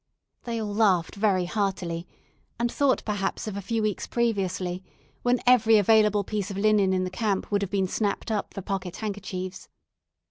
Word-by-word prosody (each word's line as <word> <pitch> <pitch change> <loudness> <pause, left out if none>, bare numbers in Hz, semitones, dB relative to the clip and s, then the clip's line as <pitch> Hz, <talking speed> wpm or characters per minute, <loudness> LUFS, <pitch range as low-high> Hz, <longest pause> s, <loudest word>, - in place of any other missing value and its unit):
They 230 -1 -2
all 210 -2 -3
laughed 195 -6 +2
very 200 -3 +1
heartily, 180 -3 -2 0.5
and 235 0 0
thought 280 -2 +1
perhaps 205 -2 -2
of 210 - -4
a 200 - -3
few 225 +3 -1
weeks 210 -2 -1
previously, 190 -6 -1 0.4
when 245 0 +2
every 225 -3 +6
available 210 0 +4
piece 205 0 -3
of 195 - -5
linen 205 -2 +3
in 185 0 +1
the 185 - -3
camp 200 0 -1
would 205 -1 +2
have 200 - -2
been 195 -2 0
snapped 205 +3 -2
up 210 -2 -2
for 195 - -7
pocket 190 -3 -3
handkerchiefs. 195 -3 -5
205 Hz, 175 wpm, -26 LUFS, 190-220 Hz, 0.5 s, every